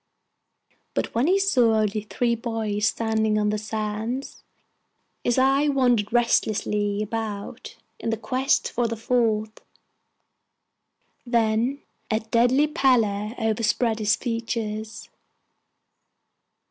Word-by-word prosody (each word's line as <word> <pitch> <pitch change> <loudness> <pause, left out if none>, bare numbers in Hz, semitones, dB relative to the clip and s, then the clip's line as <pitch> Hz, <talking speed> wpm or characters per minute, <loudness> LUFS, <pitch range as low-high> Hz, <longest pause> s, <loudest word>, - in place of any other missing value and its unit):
But - - -2
when 235 +6 +1
he 380 +3 +4
saw 255 - +3
only 215 0 0
three 235 +3 -1
boys 225 -3 -1
standing 220 -1 0
on 210 0 +1
the 210 - -1
sands, 220 +4 -4 0.8
his 240 - +1
eye 270 +3 +3
wandered 245 -7 +2
restlessly 210 -3 +1
about 220 +2 -5 0.2
in - - -3
quest 255 +5 0
of 240 -1 +1
the 230 - -2
fourth; 220 -2 0 1.6
then 235 +3 0 0.3
a 220 - +1
deadly 240 +5 +3
pallor 235 -8 +1
overspread 225 0 0
his 210 -1 +2
features. 225 -2 -4
225 Hz, 100 wpm, -24 LUFS, 215-245 Hz, 1.6 s, he